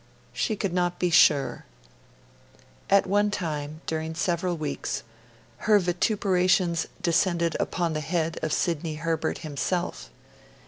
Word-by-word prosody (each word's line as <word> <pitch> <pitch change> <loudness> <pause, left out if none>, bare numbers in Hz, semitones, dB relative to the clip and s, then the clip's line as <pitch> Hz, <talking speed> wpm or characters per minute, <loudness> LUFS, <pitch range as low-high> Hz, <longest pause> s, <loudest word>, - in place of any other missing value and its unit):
She 220 - 0
could 200 -3 -2
not 175 -1 0
be 180 -1 0
sure. 150 -4 +4 1.2
At 200 - +5
one 205 +2 +2
time, 155 -5 -4
during 160 0 -3
several 175 0 0
weeks, 145 -3 -3 0.5
her 215 -1 +4
vituperations 180 -2 +1 0.2
descended 170 -1 +2
upon 170 -3 -1
the 155 - -1
head 165 0 -1
of 155 - -2
Sidney 165 -1 -1
Herbert 160 +1 -2
himself. 145 - -2
170 Hz, 120 wpm, -26 LUFS, 155-185 Hz, 1.2 s, At